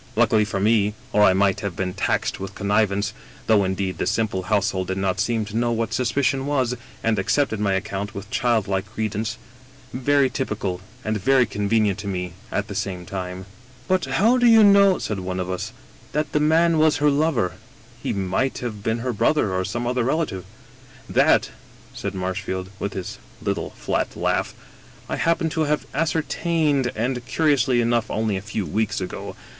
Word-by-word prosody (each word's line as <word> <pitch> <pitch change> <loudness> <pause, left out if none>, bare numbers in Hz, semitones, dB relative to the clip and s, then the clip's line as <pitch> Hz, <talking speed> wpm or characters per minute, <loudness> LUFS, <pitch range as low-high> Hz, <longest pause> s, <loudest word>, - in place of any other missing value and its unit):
Luckily 110 -1 +4
for 100 -1 -3
me— 105 0 +2 0.2
or 105 - +4
I 95 - +6
might 95 0 +2
have 100 -4 -4
been 95 -1 -2
taxed - - -1
with 95 0 -6
connivance, 100 0 +1 0.3
though 110 -3 +4
indeed 95 0 -2
the - - 0
simple 110 -4 0
household 100 -1 0
did 95 - -2
not 95 -1 0
seem 115 -2 0
to 105 +1 -8
know 120 +1 +1
what 115 -1 -1
suspicion 135 +2 +1
was, 130 -4 +1 0.3
and 110 -2 +2
accepted 110 +2 +1
my 100 -2 +1
account 100 +1 -3
with 100 0 -6
childlike 100 -5 +1
credence 110 0 -2 0.3
— 130 -1 -25
very 140 +2 +3
t)rpical, 105 -8 -3 0.3
and 110 0 0
very 130 +3 +4
convenient 105 -1 +1
to 100 - -6
me 90 -3 -3 0.2
at 105 - -1
the - - -6
same 95 -2 -3
time." 95 0 -5 0.2
" 130 0 -25
But 185 -3 +2
how 210 - +3
do 245 - +5
you 225 -2 +8
know," 200 -2 +6
said 105 -3 -3
one 90 0 -3
of 90 0 -2
us, 95 +4 -4 0.2
" - - -25
that 150 0 -1
the 150 - +2
man 160 +2 +3
was 155 -1 +4
her 150 0 +3
lover? 140 - +1 0.5
He - - -2
might 100 +7 -1
have 110 -4 -5
been 110 +2 -1
her 125 - 0
brother 105 -1 +2
or 95 0 0
some 120 +5 -3
other 125 0 0
relative." 135 - -1 0.6
"That," - - +3 0.4
said 100 -1 -5
Marshfield, 95 0 -3
with 100 - -3
his 95 -2 -6 0.2
little - - -2
flat - - -1
laugh, - - -1 0.5
"I - - -2
happen 165 0 +1
to 160 0 0
have 150 0 0
ascertained 155 -3 +1
— - - -24
^and, 125 +2 -1
curiously 135 -6 +2
enough, 120 -1 +1
only 110 -1 0
a 95 - -3
few 105 0 -3
weeks 105 +6 -1
ago. 90 -1 -6
110 Hz, 185 wpm, -23 LUFS, 95-135 Hz, 0.6 s, you